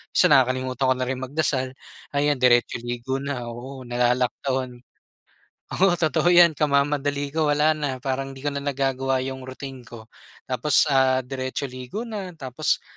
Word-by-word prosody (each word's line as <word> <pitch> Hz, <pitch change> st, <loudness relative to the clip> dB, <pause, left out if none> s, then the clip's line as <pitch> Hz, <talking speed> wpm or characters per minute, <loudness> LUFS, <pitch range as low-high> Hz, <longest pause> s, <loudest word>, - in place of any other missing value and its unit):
Minsan, -, -, +5 dB
nakakalimutan 130 Hz, 0 st, +2 dB
ko 130 Hz, -, +3 dB
na 130 Hz, 0 st, -2 dB
rin 130 Hz, 0 st, -3 dB
magdasal, 130 Hz, -1 st, 0 dB, 0.5 s
ayan 145 Hz, -1 st, +2 dB
diretso 120 Hz, -1 st, +3 dB
ligo 120 Hz, +3 st, -3 dB
na. 140 Hz, -3 st, -4 dB
Oo, 130 Hz, +2 st, -8 dB
nalalaktawan. 125 Hz, +1 st, -1 dB, 1.0 s
Oo, 190 Hz, -1 st, +4 dB
totoo 160 Hz, 0 st, 0 dB
'yan, 175 Hz, -1 st, +8 dB
kamamadali 145 Hz, -1 st, +1 dB
ko, 160 Hz, -1 st, +1 dB
wala 150 Hz, +2 st, +3 dB
na, 130 Hz, -4 st, -3 dB
parang 135 Hz, 0 st, -3 dB
'di 135 Hz, -, -12 dB
ko 145 Hz, -, +1 dB
na 140 Hz, -, -3 dB
nagagawa 135 Hz, -1 st, 0 dB
yung 130 Hz, -1 st, -6 dB
routine 130 Hz, -2 st, -9 dB
ko. 115 Hz, -1 st, -12 dB, 0.4 s
Tapos, 145 Hz, +4 st, +2 dB
ah, 130 Hz, -1 st, +3 dB
diretso 130 Hz, +1 st, -4 dB
ligo 130 Hz, -, -6 dB
na. 200 Hz, -6 st, -6 dB
Tapos 130 Hz, -5 st, -1 dB
130 Hz, 155 wpm, -24 LUFS, 130-145 Hz, 1.0 s, yan